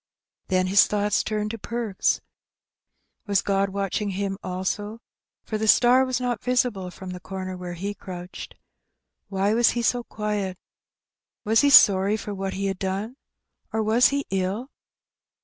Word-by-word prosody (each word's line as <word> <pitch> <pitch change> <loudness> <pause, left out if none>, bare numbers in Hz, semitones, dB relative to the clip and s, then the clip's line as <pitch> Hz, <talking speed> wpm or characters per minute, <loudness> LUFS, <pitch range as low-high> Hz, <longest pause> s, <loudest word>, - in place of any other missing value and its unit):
Then 185 -1 +2
his 195 +2 +5
thoughts 205 -1 +1
turned 215 -1 -2
to 230 - -7
Perks. 230 -3 -1 1.1
Was 200 -1 +2
God 195 0 +1
watching 200 +1 -2
him 195 0 -3
also? 190 +4 -3 0.4
for 215 - -4
the 220 - -1
star 250 +4 +5
was 255 -1 -1
not 245 -3 -2
visible 245 -7 0
from 185 +1 -9
the 180 - -7
comer 185 0 -6
where 180 -1 -6
he 200 +4 -4
crouched. 180 -2 -9 0.7
Why 195 +1 0
was 235 +1 +4
he 235 - 0
so 245 +1 +1
quiet? 210 -4 -3 0.9
Was 220 +2 +3
he 285 - +4
sorry 200 -5 +6
for 210 -1 -6
what 195 -1 -4
he 195 +1 -2
had 195 -1 -2
done, 195 +5 -3 0.6
or 220 0 0
was 225 +3 +4
he 280 0 -1
ill? 195 +7 -2
205 Hz, 155 wpm, -24 LUFS, 190-220 Hz, 1.1 s, sorry